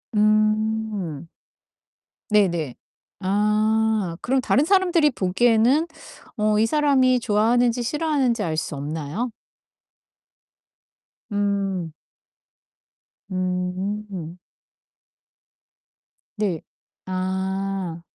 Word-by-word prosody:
음. 215 -5 +1 1.0
네네. 175 -10 +2 0.4
아 210 -1 +1
그럼 265 +2 +1
다른 270 +3 +2
사람들이 355 -5 +3
보기에는 235 - +2 0.5
어 210 0 +2
이 220 - +4
사람이 260 -2 +3
좋아하는지 235 +2 +2
싫어하는지 275 -5 0
알 160 -2 -2
수 155 - -3
없나요? 155 - -4 2.0
음. 195 -4 -1 1.4
음. 185 0 -3 2.0
네. 200 -7 -1 0.4
아. 190 -1 -3
210 Hz, 130 characters per minute, -23 LUFS, 185-235 Hz, 2.0 s, 이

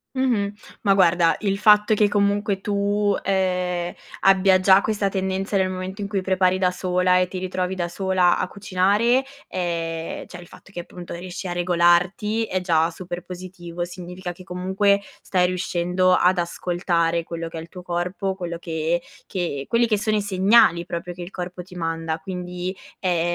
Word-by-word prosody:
Mh-mh. 235 -6 +1 0.3
Ma 200 - +4
guarda, 175 -3 +4
il 195 -2 0
fatto 210 +1 +5
che 210 0 +4
comunque 200 -1 +1
tu, 205 0 +1
ehm, 180 -2 0 0.3
abbia 190 -1 +5
già 190 +1 +6
questa 205 -2 0
tendenza 190 +1 -1
nel 190 -1 +2
momento 185 +2 -5
in 200 - -2
cui 200 -1 -1
prepari 185 0 +2
da 185 -1 +3
sola 180 0 +1
e 180 0 +2
ti 185 +1 -5
ritrovi 185 0 -2
da 175 -2 -2
sola 185 0 +2
a - - -1
cucinare, 205 +6 +2 0.2
ehm, 165 -2 -3
cioè - - -10
il 175 - -11
fatto 195 - -16
che 175 - -5
appunto 175 0 -9
riesci 180 +2 -6
a - - -3
regolarti 175 +5 +2
è 185 -3 -2
già 165 -2 +2
super 175 0 -7
positivo, 175 -1 -6
significa 180 0 -7
che 185 - -13
comunque 190 +2 +1 0.2
stai 180 -2 +2
riuscendo 180 0 +1
ad 180 +1 +4
ascoltare 170 -1 0
quello 165 0 -5
che 165 - -8
è - - -4
il 165 - -11
tuo 180 - -10
corpo, 180 +2 -2
quelli 175 -3 -5
che 165 0 -1 0.2
che 170 -7 -3
quelli 235 0 +2
che 215 -2 +2
sono 215 +1 0
i - - +1
segnali 190 -3 +4
proprio 175 +1 -5
che 175 - -7
il 175 - -9
corpo 180 -1 -6
ti 185 +1 -15
manda, 165 -1 -2
quindi 180 +1 -5 0.2
è 180 -3 +1
185 Hz, 175 wpm, -23 LUFS, 175-195 Hz, 0.3 s, già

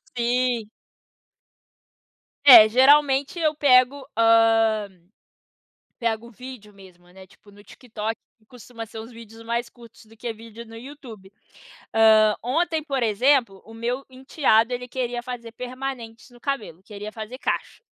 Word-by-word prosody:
Sim. 240 -2 -1 1.8
É, 235 -6 +10
geralmente, 275 +4 +3
eu 310 -2 +1
pego, 270 -1 +3
hã, 225 -2 +3 1.1
pego 230 0 -3
vídeo, 240 -3 -12
mesmo, 180 -3 -18
né, 190 +1 -15
tipo, 205 +2 -22
no 205 0 -18
TikTok, 225 -3 -6 0.2
que 220 - -32
costuma 235 -1 -11
ser 220 0 -10
uns 225 +2 -11
vídeos 230 -1 -14
mais 235 +1 -3
curtos 235 -2 -18
do 220 +1 -20
que 235 +1 -5
vídeo 225 +1 -12
no 225 0 -13
YouTube. 230 -6 -12 0.6
Hã, 220 -1 +5
ontem, 320 +5 -1
por 275 -4 -2
exemplo, 235 -2 +1
o 225 - -14
meu 240 +4 -4
enteado, 255 -3 +1
ele 250 0 -5
queria 245 -1 -4
fazer 240 -2 -8
permanentes 250 -2 -7
no 240 - -18
cabelo; 220 - -5
queria 210 0 -9
fazer 220 +3 -8
cacho. - - -4
235 Hz, 135 wpm, -23 LUFS, 220-255 Hz, 1.8 s, É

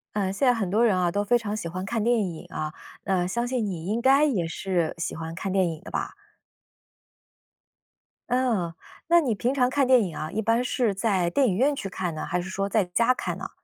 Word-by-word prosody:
嗯， 195 -2 0
现 230 +7 +1
在 250 - +6
很 215 -6 -2
多 220 +5 +3
人 205 -5 +3
啊， 175 -1 +1
都 205 +3 -1
非 240 +3 +4
常 215 -2 -4
喜 190 -6 -4
欢 185 +2 -5
看 225 +3 -2
电 230 -1 +2
影 165 -2 -9
啊。 155 0 -4 0.3
呃， 180 -2 0
相 235 +5 -1
信 245 -3 -1
你 175 -4 -4
应 220 +4 0
该 270 +3 +5
也 205 - +1
是 175 -1 -1
喜 170 - -3
欢 160 0 -6
看 190 +3 -3
电 190 -1 +2
影 160 -2 -5
的 - - -10
吧？ - - -3 2.1
嗯， 235 -9 +1 0.3
那 340 0 +6
你 250 -8 0
平 245 +5 0
常 250 -3 +2
看 275 +1 +2
电 255 -1 +5
影 175 -5 -5
啊， 155 - -4
一 220 - -1
般 230 +3 +2
是 245 -5 0
在 190 -4 +1
电 265 +9 +2
影 190 - +1
院 280 +5 +3
去 200 - -5
看 180 -3 -3
呢， 155 - -4
还 180 0 -1
是 185 - -7
说 195 +1 -2
在 205 +1 +2
家 230 +8 +2
看 - - -4
呢？ - - -6
205 Hz, 250 characters per minute, -26 LUFS, 180-245 Hz, 2.1 s, 在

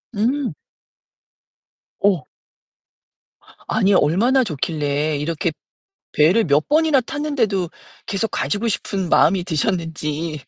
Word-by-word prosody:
음. 250 +6 0 1.5
어. 185 -9 +2 1.4
아니, 205 -2 +2
얼마나 225 - +3
좋길래 150 - -1
이렇게 160 +2 -2 0.6
배를 175 +10 +4
몇 145 0 +2
번이나 310 -2 +3
탔는데도 230 - -1 0.4
계속 205 +3 -1
가시고 210 +3 -1
싶은 190 -3 -2
마음이 180 +1 +4
드셨는지. 160 -3 -2
185 Hz, 210 characters per minute, -20 LUFS, 155-230 Hz, 1.5 s, 배를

